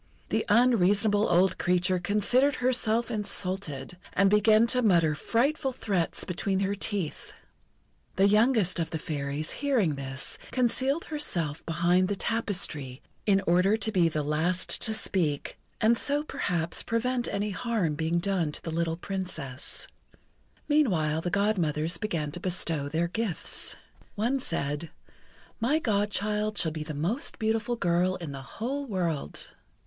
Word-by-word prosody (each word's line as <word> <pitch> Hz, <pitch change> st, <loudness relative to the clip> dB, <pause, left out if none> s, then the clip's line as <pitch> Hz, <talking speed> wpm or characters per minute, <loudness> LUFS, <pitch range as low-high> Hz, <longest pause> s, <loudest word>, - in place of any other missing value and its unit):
The -, -, +1 dB
unreasonable 205 Hz, -2 st, +4 dB
old 180 Hz, +1 st, +3 dB
creature 180 Hz, +1 st, +2 dB
considered 210 Hz, +9 st, +2 dB
herself 240 Hz, -2 st, +1 dB
insulted, 185 Hz, -, -3 dB, 0.2 s
and 195 Hz, +1 st, +3 dB
began 215 Hz, +2 st, +5 dB
to 250 Hz, -, +2 dB
mutter 170 Hz, -8 st, +3 dB
frightful 265 Hz, -, 0 dB
threats 195 Hz, -9 st, -1 dB
between 190 Hz, +2 st, -1 dB
her 200 Hz, 0 st, 0 dB
teeth. 200 Hz, -5 st, -3 dB, 0.8 s
The 195 Hz, +1 st, +4 dB
youngest 210 Hz, -4 st, +3 dB
of 165 Hz, -1 st, -1 dB
the 160 Hz, -, -3 dB
Fairies, 145 Hz, 0 st, -3 dB
hearing 250 Hz, -, +1 dB
this, 135 Hz, -1 st, -3 dB
concealed 265 Hz, +5 st, +1 dB
herself 175 Hz, -, -1 dB
behind 175 Hz, +3 st, +2 dB
the 205 Hz, -, -1 dB
tapestry, 185 Hz, -, -1 dB, 0.2 s
in 195 Hz, -1 st, +3 dB
order 180 Hz, +5 st, +3 dB
to 220 Hz, 0 st, +1 dB
be 175 Hz, -5 st, +3 dB
the 155 Hz, -1 st, -2 dB
last 160 Hz, +5 st, 0 dB
to 220 Hz, -, +1 dB
speak, 165 Hz, -9 st, -1 dB, 0.2 s
and 225 Hz, +2 st, +4 dB
so 285 Hz, +5 st, +2 dB
perhaps 170 Hz, -, -2 dB
prevent 240 Hz, +2 st, -1 dB
any 205 Hz, +1 st, -2 dB
harm 205 Hz, -5 st, -1 dB
being 160 Hz, +3 st, -1 dB
done 175 Hz, -3 st, 0 dB
to -, -, -5 dB
the 165 Hz, -, -4 dB
little 165 Hz, 0 st, -1 dB
Princess. 175 Hz, -9 st, -5 dB, 0.8 s
Meanwhile 175 Hz, -, +2 dB
the 175 Hz, -, -2 dB
Godmothers 170 Hz, -5 st, 0 dB
began 165 Hz, -8 st, -2 dB
to 175 Hz, -, -5 dB
bestow 165 Hz, -5 st, -1 dB
their 165 Hz, +3 st, 0 dB
gifts. 205 Hz, -1 st, -2 dB, 0.4 s
One 235 Hz, +6 st, 0 dB
said: 155 Hz, -, -2 dB, 0.7 s
"My 250 Hz, +7 st, +2 dB
Godchild 210 Hz, -3 st, 0 dB
shall 160 Hz, -, +3 dB
be 155 Hz, 0 st, -5 dB
the 155 Hz, -1 st, -6 dB
most 180 Hz, -, -1 dB
beautiful 220 Hz, +2 st, 0 dB
girl 180 Hz, -2 st, +1 dB
in 170 Hz, -6 st, -6 dB
the 135 Hz, -1 st, -7 dB
whole 270 Hz, -, -4 dB
world." 170 Hz, -, -3 dB
190 Hz, 140 wpm, -28 LUFS, 165-220 Hz, 0.8 s, began